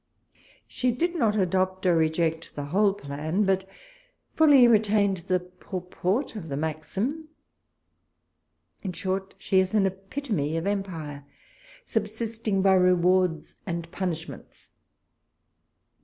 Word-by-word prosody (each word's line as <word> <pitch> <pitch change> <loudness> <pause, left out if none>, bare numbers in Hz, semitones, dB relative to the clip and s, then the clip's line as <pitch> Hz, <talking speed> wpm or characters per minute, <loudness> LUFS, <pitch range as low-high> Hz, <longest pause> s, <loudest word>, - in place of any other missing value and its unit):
She 250 - -1
did 340 +9 -1
not 225 -9 +2
adopt 185 -1 0
or 180 -2 +4
reject 160 0 0
the 145 - -4
whole 195 +6 +2
plan, 155 +4 -2
but 190 0 +1 0.7
fully 285 -6 +7
retained 210 -3 +3
the 180 +1 0
purport 180 +6 -3
of 170 -7 -7
the 140 - -3
maxim. 195 - -3 1.5
In 190 -3 -4
short, 190 +1 -3
she 190 - +2
is 190 +3 +1
an 205 -2 +4
epitome 195 - -2
of 165 - -3
empire, 165 -8 -3 0.6
subsisting 220 -2 -2
by 195 -1 +5
rewards 180 -2 +3
and 170 -2 -4
punishments. 175 -3 -5
190 Hz, 110 wpm, -26 LUFS, 170-210 Hz, 1.5 s, fully